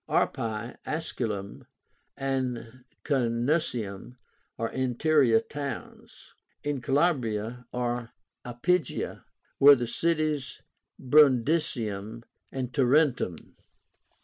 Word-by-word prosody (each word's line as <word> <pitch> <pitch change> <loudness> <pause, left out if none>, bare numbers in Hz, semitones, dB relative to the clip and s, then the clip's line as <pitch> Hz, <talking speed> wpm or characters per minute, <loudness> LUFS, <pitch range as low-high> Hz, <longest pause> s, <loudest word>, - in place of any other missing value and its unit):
Arpi, 115 +1 -1
Asculum, 110 -11 -4 0.5
and 130 -3 -3 0.2
Canusium 120 - -1 0.4
are 115 0 -2
interior 130 -1 +3
towns. 140 +3 -8 0.3
In 145 -3 -2
Calabria 125 -5 0
(or 120 -1 -2 0.3
Iapygia) 140 +6 -1 0.3
were 140 +1 +9
the 125 -2 -2
cities 155 +1 -1 0.4
of - - -14
Brundisium 120 -7 +3 0.3
and 130 -2 -4
Tarentum. 135 - +1
125 Hz, 75 wpm, -28 LUFS, 115-145 Hz, 0.5 s, were